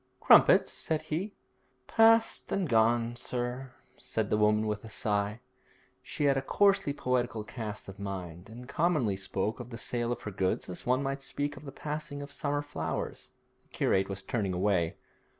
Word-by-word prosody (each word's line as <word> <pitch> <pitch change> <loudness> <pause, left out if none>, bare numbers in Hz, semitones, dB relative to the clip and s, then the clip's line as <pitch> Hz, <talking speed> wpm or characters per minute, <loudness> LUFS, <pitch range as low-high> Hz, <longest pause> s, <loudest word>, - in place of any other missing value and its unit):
'Crumpets?' - - +6
said 160 -1 -2
he. 190 +7 -3 0.5
'Past 225 - +4
and 195 -3 0
gone, 115 0 +3
sir,' 125 +2 -3 0.3
said - - -2
the 105 - +3
woman 105 +1 +3
with 105 0 -2
a 110 - -9
sigh. 105 0 -1 0.6
She - - -4
had 140 -1 +4
a - - +1
coarsely 195 +2 +3
poetical 125 -5 -1
cast 110 -1 -6
of 95 0 -10
mind, 95 -2 -6
and 120 +2 -10
commonly 150 - +1
spoke 95 +3 -2
of 125 -1 -7
the 115 - -7
sale 120 +1 -2
of 120 - -4
her 105 - -4
goods 95 -1 -1
as 90 - -7
one 130 +2 +2
might 135 0 -2
speak 145 +1 -3
of 145 - -12
the 135 - -7
passing 150 -1 -5
of 140 - -9
summer 145 0 -2
flowers. 80 - -4 0.3
The - - -36
curate 95 +1 +1
was 95 0 -4
turning 100 -2 -1
away. 90 -3 +1
120 Hz, 175 wpm, -30 LUFS, 105-145 Hz, 0.6 s, Crumpets